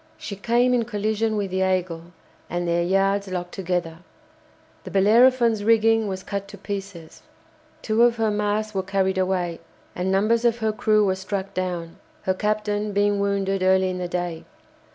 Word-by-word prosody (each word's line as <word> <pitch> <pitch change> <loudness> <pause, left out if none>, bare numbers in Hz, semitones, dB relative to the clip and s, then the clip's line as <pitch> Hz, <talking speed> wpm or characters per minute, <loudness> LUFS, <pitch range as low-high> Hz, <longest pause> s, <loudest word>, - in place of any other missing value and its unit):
She 200 - -6
came 240 +5 +2
in 240 -2 +1
collision 215 0 -1
with 200 -2 -2
the 190 - -1
"Aigle," 180 -3 -1 0.4
and 175 0 -2
their 170 0 +1
yards 195 +3 +1
locked 180 -1 -4
together. 175 -3 -3 0.8
The - - -8
"Bellerophon's" 230 +2 +4
rigging 225 0 +3
was 190 -1 -4
cut 200 -1 -4
to 200 - -11
pieces; 195 -4 -7 0.6
two 220 +1 +1
of 240 -1 +5
her 225 -2 0
masts 210 +1 -1
were 190 - 0
carried 190 0 0
away, 180 -2 -1 0.4
and 180 +1 -1
numbers 215 +4 +2
of 235 -1 +2
her 220 -2 0
crew 215 -1 +2
were 190 - +2
struck 190 +1 -4
down, 175 -2 -4 0.3
her 185 - +1
captain 210 +1 -1
being 205 0 +2
wounded 195 -1 0
early 190 0 +3
in 180 - -5
the 180 - -3
day. 175 -2 -3
200 Hz, 170 wpm, -23 LUFS, 185-215 Hz, 0.8 s, of